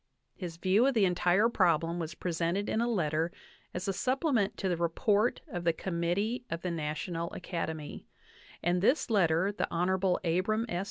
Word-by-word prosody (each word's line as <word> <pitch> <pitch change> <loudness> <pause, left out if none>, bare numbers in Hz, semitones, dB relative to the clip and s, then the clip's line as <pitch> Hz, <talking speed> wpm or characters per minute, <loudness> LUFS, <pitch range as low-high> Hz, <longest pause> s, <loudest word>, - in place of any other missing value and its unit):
His 175 -4 -7
view 195 +8 +3
of 275 - +1
the 210 -3 +5
entire 180 +3 +3
problem 170 -6 +2
was 165 -1 -4
presented 175 +3 -1
in 220 - +1
a 235 - +1
letter 165 -6 0 0.4
as 180 +3 -4
a 195 - +1
supplement 255 - 0
to 195 - -2
the 180 - +1
report 200 +7 +1
of 175 -4 -5
the 170 -1 +3
Committee 185 +8 -1
of 165 +1 -4
the 180 - -1
National 165 +2 -3
Academy; 160 -4 -5 0.6
and 175 +1 +2
this 250 - +2
letter 185 -2 +3
the 205 - -2
Hon. 180 +2 +1
Abram 190 +7 +1
S. 175 -6 -2
180 Hz, 170 wpm, -30 LUFS, 170-205 Hz, 0.6 s, the